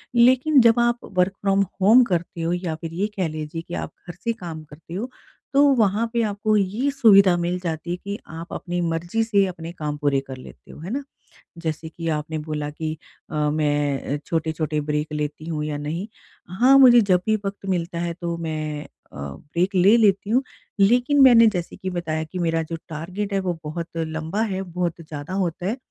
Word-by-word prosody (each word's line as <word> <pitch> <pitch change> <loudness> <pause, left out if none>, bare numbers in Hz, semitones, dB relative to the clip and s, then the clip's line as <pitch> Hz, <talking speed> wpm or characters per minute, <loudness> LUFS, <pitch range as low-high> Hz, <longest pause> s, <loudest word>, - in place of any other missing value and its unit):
लेकिन 260 +4 +5
जब 230 0 +5
आप 240 0 +2 0.2
वर्क 180 +2 +3
फ्रॉम 195 0 +2 0.2
होम 230 +6 +7
करते 170 0 -2
हो 165 +1 0
या 175 -3 -2
फिर 165 0 -6
ये 205 - +2
कह 185 -3 +1
लीजिए 155 +1 -5
कि 170 - -11
आप - - -4 0.2
घर 175 - -6
से 230 - 0
काम 170 -8 -8
करते 155 +3 -13
हो, 230 +7 -3 0.5
तो 280 - +7
वहाँ 215 -1 +2
पे 235 - +2
आपको 210 +1 0
ये 210 +8 0
सुविधा 200 -9 +6
मिल 175 +1 -1
जाती 165 0 -3
है 175 - -2
कि 200 +2 -5 0.2
आप 165 +1 -7
अपनी 175 0 -3
मर्ज़ी 175 +7 -1
से 205 -3 +3
अपने 170 -2 -7
काम 150 -3 -4
पूरे 145 -2 +1
कर 130 -1 -7
लेते 130 - -13
हो। - - -12
है 165 +4 -7
ना? 275 +3 -2 0.5
जैसे 160 -1 -4
कि 165 +1 -6
आपने 155 +1 -2
बोला 150 -1 -4
कि 155 +1 -4 0.4
अ, - - -6
मैं 145 -2 0
छोटे-छोटे 160 -1 -1
ब्रेक 150 +1 -2
लेती 150 +1 -4
हूँ 155 -2 -2
या 150 -1 -3
नहीं, 160 +7 -4 0.5
हाँ 265 +3 +7
मुझे 245 -3 +8
जब 185 -4 +2
भी 220 - +3
वक़्त 195 0 -5
मिलता 170 -2 -1
है 170 0 -2
तो 170 -1 -2
मैं 155 -2 -4
अ, - - -13 0.3
ब्रेक 145 - -3
ले 190 +5 +6
लेती 205 -2 +3
हूँ। 255 +4 +3 0.4
लेकिन 245 +8 +4
मैंने 235 -3 +8
जैसे 180 -5 -2
कि 185 - -5
बताया 165 -3 -2
कि 170 +4 -7
मेरा 165 -1 +1
जो 165 - -3
टारगेट 185 +6 -4
है 195 - +2
वो 180 -3 -2
बहुत 165 +2 -5
लंबा 160 +4 -2
है, 195 -4 -1
बहुत 175 -2 -3
ज़्यादा 150 +1 -7
होता 180 -2 -2
है। 220 +6 -1
175 Hz, 200 wpm, -23 LUFS, 155-205 Hz, 0.5 s, मुझे